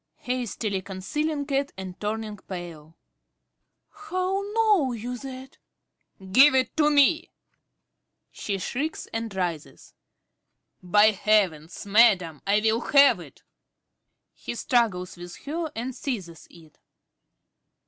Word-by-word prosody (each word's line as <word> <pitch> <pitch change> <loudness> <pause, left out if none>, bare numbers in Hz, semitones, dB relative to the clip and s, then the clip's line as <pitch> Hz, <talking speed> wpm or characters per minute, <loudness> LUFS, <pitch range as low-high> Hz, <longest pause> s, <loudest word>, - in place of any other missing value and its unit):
~Dorothy~ 250 - 0
(hastily 215 -5 -3
concealing 285 +11 -3
it 275 0 0
and 185 -1 -8
turning 215 0 -3
pale). 170 -4 -9 1.1
How 370 +1 -1
know 415 - +3
you 240 +2 -5
that? 265 0 -10 0.6
~Carey~. 190 -1 -13
Give 270 +6 +7
it 255 -2 +1
to 300 -1 +4
me! 300 +3 +3 1.0
(She 200 -2 -4
shrieks 280 +11 -3
and 225 -1 -3
rises.) 175 -5 -5 0.9
By 205 +4 +5
heavens, 190 -7 0
madam, 195 -7 +4
I 205 +1 +3
will 220 +2 +1
have 280 -1 +5
it! - - -14 0.9
(_He 240 - -7
struggles 200 -9 0
with 175 0 -9
her 320 +2 -3
and 245 +3 -4
seizes 195 - -6
it. 160 -3 -18
220 Hz, 115 wpm, -25 LUFS, 185-275 Hz, 1.1 s, Give